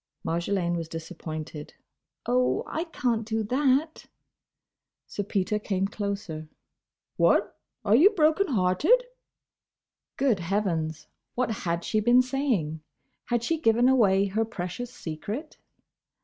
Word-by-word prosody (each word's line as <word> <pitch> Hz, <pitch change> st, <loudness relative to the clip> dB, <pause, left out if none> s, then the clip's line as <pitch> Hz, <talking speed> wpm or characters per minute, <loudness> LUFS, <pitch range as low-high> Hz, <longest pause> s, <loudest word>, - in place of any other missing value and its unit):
Marjolaine 170 Hz, +1 st, 0 dB
was 165 Hz, -1 st, -4 dB
disappointed. 160 Hz, -2 st, -7 dB, 0.5 s
"Oh!—I 125 Hz, -, 0 dB
can't 240 Hz, -8 st, -1 dB
do 220 Hz, 0 st, -1 dB
that!" 275 Hz, +6 st, +1 dB, 1.0 s
Sir -, -, -4 dB
Peter 205 Hz, +1 st, -1 dB
came 195 Hz, -2 st, -1 dB
closer. 200 Hz, -6 st, -4 dB, 0.7 s
"What? -, -, +3 dB, 0.3 s
Are 210 Hz, +1 st, +5 dB
you 325 Hz, -, +7 dB
broken 340 Hz, -1 st, +2 dB
hearted?" 250 Hz, -, +3 dB, 1.1 s
Good 255 Hz, -8 st, +2 dB
heavens! 170 Hz, -4 st, -1 dB, 0.3 s
What 250 Hz, -1 st, 0 dB
had 170 Hz, -5 st, -2 dB
she 215 Hz, -, 0 dB
been 240 Hz, +4 st, +5 dB
saying? 250 Hz, -, -1 dB, 0.5 s
Had 240 Hz, -1 st, 0 dB
she 325 Hz, +6 st, 0 dB
given 230 Hz, 0 st, +4 dB
away 200 Hz, -7 st, +4 dB
her 205 Hz, +3 st, 0 dB
precious 225 Hz, +2 st, -5 dB
secret? 210 Hz, -, -6 dB
210 Hz, 110 wpm, -27 LUFS, 175-250 Hz, 1.1 s, you